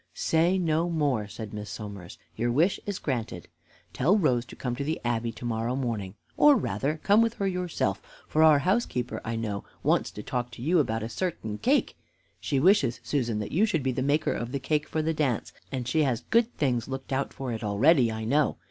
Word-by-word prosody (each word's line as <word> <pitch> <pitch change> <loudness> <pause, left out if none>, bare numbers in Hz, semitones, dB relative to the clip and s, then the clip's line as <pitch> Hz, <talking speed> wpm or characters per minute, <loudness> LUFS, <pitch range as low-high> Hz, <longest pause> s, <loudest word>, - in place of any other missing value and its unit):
"Say 170 +4 +2
no 165 -1 +1
more," 145 -10 0
said 105 +1 -8
Miss 105 0 -6
Somers; 100 -4 -8 0.2
"your 120 +2 0
wish 165 +10 +2
is 200 -2 -2
granted. 115 - -4 0.5
Tell 175 +11 +3
Rose 125 - +2
to - - -12
come 125 -2 -3
to 140 - -2
the 155 +3 -2
Abbey 115 -1 0
to 120 - -9
morrow 115 +1 -1
morning, 110 -7 -3 0.2
or 295 -1 +7
rather 140 - -1
come 205 +2 +5
with 230 0 +1
her 200 - -2
yourself, 180 - -1 0.3
for 155 - +1
our 155 -2 +7
housekeeper, 145 - -1
I 115 - -3
know, 105 -3 -3 0.2
wants - - +2
to 105 - -9
talk 125 -1 -3
to - - -10
you 170 +4 +3
about 110 -6 0
a - - -3
certain 115 - -3
cake. 280 +4 +1 0.4
She 140 - 0
wishes, 140 - +3
Susan, 120 -5 -1
that 105 - -5
you 185 +7 +2
should 160 -9 0
be 130 - +1
the 130 - -2
maker 145 +4 +1
of 120 +1 -4
the 140 - -2
cake 150 +2 -1
for 155 -1 -1
the 160 +1 0
dance, 140 -8 -1 0.2
and 130 -3 -3
she 155 +6 +2
has 130 -5 +1
good 230 +1 +4
things 125 -5 0
looked 135 0 -5
out 135 +1 -1
for 130 -2 -5
it 115 0 -4
already, 120 +5 +4
I 110 0 -4
know. 145 +5 +2
130 Hz, 215 wpm, -27 LUFS, 115-160 Hz, 0.5 s, or